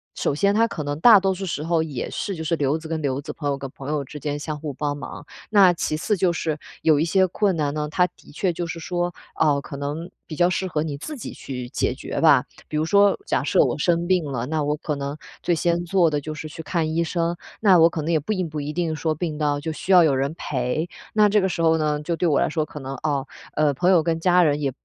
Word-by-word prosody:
首 -, -, 0 dB
先 200 Hz, +5 st, +2 dB
它 230 Hz, +2 st, +3 dB
可 155 Hz, -8 st, -5 dB
能 145 Hz, 0 st, -3 dB
大 220 Hz, -5 st, +9 dB
多 190 Hz, 0 st, +1 dB
数 190 Hz, +1 st, -5 dB
时 150 Hz, -3 st, -3 dB
候 165 Hz, 0 st, +1 dB
也 140 Hz, -6 st, -4 dB
是 200 Hz, -, -3 dB
就 160 Hz, -, -6 dB
是 165 Hz, +2 st, 0 dB
留 145 Hz, +1 st, +1 dB
子 160 Hz, 0 st, -9 dB
跟 160 Hz, -1 st, -3 dB
留 135 Hz, -1 st, -1 dB
子、 150 Hz, -, -6 dB
朋 145 Hz, -2 st, -3 dB
友 140 Hz, -, 0 dB
跟 135 Hz, -1 st, -6 dB
朋 135 Hz, +1 st, -8 dB
友 150 Hz, -2 st, -1 dB
之 150 Hz, -, -9 dB
间 145 Hz, -1 st, -2 dB
相 150 Hz, 0 st, -4 dB
互 150 Hz, -2 st, -5 dB
帮 145 Hz, +1 st, -2 dB
忙。 145 Hz, +2 st, -8 dB, 0.2 s
那 195 Hz, -4 st, +6 dB
其 155 Hz, -2 st, -2 dB
次 210 Hz, +6 st, 0 dB
就 175 Hz, 0 st, +2 dB
是 155 Hz, -2 st, -2 dB, 0.2 s
有 155 Hz, -2 st, +4 dB
一 -, -, +2 dB
些 190 Hz, +2 st, +3 dB
困 195 Hz, 0 st, +1 dB
难 145 Hz, -1 st, 0 dB
呢， 150 Hz, 0 st, -2 dB
它 180 Hz, +2 st, +3 dB
的 -, -, -17 dB
确 180 Hz, +2 st, 0 dB
就 175 Hz, +1 st, -3 dB
是 165 Hz, -, -5 dB
说， 175 Hz, +1 st, -2 dB, 0.2 s
哦， 145 Hz, -3 st, +2 dB
可 140 Hz, -, -8 dB
能 150 Hz, +5 st, -4 dB, 0.2 s
比 155 Hz, -, -6 dB
较 175 Hz, +2 st, +3 dB
适 185 Hz, +1 st, -1 dB
合 155 Hz, -3 st, -1 dB
你 145 Hz, -3 st, -4 dB
自 305 Hz, -, -6 dB
己 245 Hz, -, -7 dB
去 125 Hz, -2 st, -7 dB
解 -, -, 0 dB
决 -, -, -5 dB
吧。 -, -, +6 dB, 0.2 s
比 155 Hz, -, -6 dB
如 155 Hz, -, +1 dB
说 200 Hz, +2 st, +4 dB
假 -, -, 0 dB
设 -, -, +4 dB
我 -, -, -1 dB
生 170 Hz, -1 st, +1 dB
病 180 Hz, -4 st, +2 dB
了， 125 Hz, -4 st, -3 dB
那 155 Hz, 0 st, -1 dB
我 150 Hz, +1 st, 0 dB
可 150 Hz, -2 st, -3 dB
能 140 Hz, +2 st, -4 dB, 0.2 s
最 175 Hz, -, +1 dB
先 170 Hz, +2 st, 0 dB
做 175 Hz, -2 st, +3 dB
的 150 Hz, -1 st, -1 dB
就 155 Hz, +2 st, -6 dB
是 155 Hz, 0 st, -7 dB
去 160 Hz, -, -8 dB
看 160 Hz, -2 st, -1 dB
医 165 Hz, -, +1 dB
生， 170 Hz, +1 st, -1 dB, 0.2 s
那 190 Hz, -5 st, +6 dB
我 165 Hz, +1 st, +7 dB
可 160 Hz, -, -4 dB
能 165 Hz, +3 st, -2 dB
也 160 Hz, -, +3 dB
并 185 Hz, +1 st, -2 dB
不 150 Hz, 0 st, -4 dB
一 145 Hz, +1 st, -4 dB
定 165 Hz, -1 st, -1 dB
说 155 Hz, -1 st, -1 dB
病 155 Hz, -2 st, -3 dB
到 145 Hz, -2 st, 0 dB
就 160 Hz, -, -3 dB
需 185 Hz, +4 st, -4 dB
要 175 Hz, -2 st, +8 dB
有 150 Hz, -4 st, +3 dB
人 140 Hz, +3 st, -1 dB
陪。 135 Hz, +5 st, -2 dB, 0.2 s
那 210 Hz, -1 st, +5 dB
这 210 Hz, +1 st, +4 dB
个 190 Hz, -, +1 dB
时 170 Hz, -2 st, -3 dB
候 160 Hz, 0 st, +4 dB
呢， 150 Hz, -1 st, 0 dB
就 170 Hz, +2 st, -2 dB
对 175 Hz, -, +1 dB
我 145 Hz, -, +3 dB
来 -, -, +2 dB
说 155 Hz, 0 st, -1 dB
可 150 Hz, -, -9 dB
能， 135 Hz, +1 st, -5 dB
哦， 140 Hz, -3 st, 0 dB, 0.3 s
呃， 150 Hz, -2 st, +2 dB
朋 175 Hz, +7 st, +1 dB
友 175 Hz, -4 st, +5 dB
跟 165 Hz, -1 st, 0 dB
家 180 Hz, +1 st, +4 dB
人 145 Hz, -2 st, +2 dB
也 135 Hz, -2 st, 0 dB
160 Hz, 295 characters per minute, -23 LUFS, 145-175 Hz, 0.3 s, 大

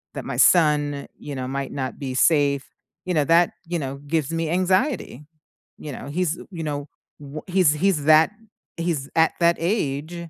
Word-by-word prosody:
that -, -, -5 dB
my -, -, -4 dB
son, 145 Hz, -4 st, +3 dB
you 145 Hz, -, -8 dB
know, 130 Hz, -1 st, -4 dB
might 135 Hz, 0 st, -4 dB
not 130 Hz, -2 st, -4 dB
be 130 Hz, -3 st, -4 dB
safe, 140 Hz, -3 st, +3 dB, 0.4 s
you 180 Hz, -, -1 dB
know, 150 Hz, -3 st, +3 dB
that, 165 Hz, +3 st, +4 dB, 0.2 s
you 175 Hz, +1 st, -1 dB
know, 140 Hz, -3 st, -4 dB
gives 155 Hz, -1 st, -1 dB
me 165 Hz, -1 st, -1 dB
anxiety. 185 Hz, -, 0 dB, 0.5 s
You 150 Hz, -, -8 dB
know, 135 Hz, -, -8 dB
he's, 170 Hz, +2 st, -1 dB
you 165 Hz, -3 st, -5 dB
know, 145 Hz, -1 st, -4 dB, 0.3 s
w 145 Hz, +1 st, -8 dB
he's 180 Hz, -5 st, +3 dB
he's 155 Hz, -2 st, +1 dB
that 155 Hz, +3 st, +6 dB, 0.5 s
he's 165 Hz, -5 st, -2 dB
at 160 Hz, 0 st, +4 dB
that 170 Hz, 0 st, +3 dB
age, 165 Hz, -4 st, -1 dB
155 Hz, 175 wpm, -23 LUFS, 140-170 Hz, 0.5 s, that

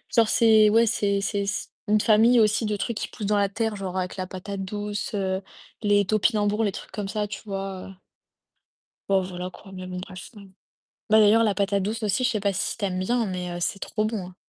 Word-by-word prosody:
genre 225 Hz, -2 st, +5 dB
c'est 220 Hz, -2 st, +5 dB
ouais, 230 Hz, +2 st, +5 dB
c'est 200 Hz, -2 st, +1 dB
c'est 200 Hz, 0 st, -1 dB
c 200 Hz, -, -3 dB, 0.2 s
une 210 Hz, 0 st, +3 dB
famille 230 Hz, +2 st, +5 dB
aussi 215 Hz, +1 st, +3 dB
de 210 Hz, -, 0 dB
trucs 230 Hz, +1 st, -3 dB
qui -, -, -3 dB
poussent 215 Hz, -, -6 dB
dans 210 Hz, -1 st, +2 dB
la 200 Hz, -1 st, +2 dB
terre, 220 Hz, +1 st, -2 dB
genre 190 Hz, -2 st, -5 dB
avec 180 Hz, -1 st, -2 dB
la 185 Hz, -, -2 dB
patate 195 Hz, +1 st, -6 dB
douce, 205 Hz, +2 st, -4 dB
heu, 190 Hz, -1 st, -1 dB, 0.4 s
les 205 Hz, -1 st, +3 dB
topinambours, 210 Hz, +1 st, +1 dB
les 205 Hz, -, +1 dB
trucs -, -, -9 dB
comme 205 Hz, -2 st, -4 dB
ça, 210 Hz, +1 st, -2 dB
tu -, -, -7 dB
vois? 195 Hz, -2 st, -5 dB
Heu 195 Hz, -, -11 dB, 1.2 s
bon 195 Hz, -1 st, +3 dB
voilà, 180 Hz, 0 st, -5 dB
quoi 195 Hz, +1 st, -14 dB
mais 185 Hz, -1 st, -7 dB
bon 180 Hz, 0 st, -6 dB
bref. 185 Hz, 0 st, -9 dB, 0.8 s
Bah 220 Hz, 0 st, +6 dB
d'ailleurs, 215 Hz, +2 st, +6 dB
la 205 Hz, -3 st, +1 dB
patate 200 Hz, 0 st, +1 dB
douce 220 Hz, +3 st, -3 dB
aussi, 215 Hz, +5 st, 0 dB
je 255 Hz, -, +3 dB
sais 220 Hz, -, -1 dB
pas 200 Hz, 0 st, 0 dB
si 190 Hz, -, -2 dB
tu 205 Hz, -, -1 dB
aimes 185 Hz, -1 st, -2 dB
bien, 235 Hz, +5 st, +1 dB
mais 180 Hz, -2 st, -4 dB
heu, 175 Hz, -, -4 dB
c'est 195 Hz, +3 st, -2 dB
trop 215 Hz, 0 st, -2 dB
bon 215 Hz, -5 st, -3 dB
hein. 180 Hz, -, -14 dB
205 Hz, 230 wpm, -25 LUFS, 190-215 Hz, 1.2 s, Bah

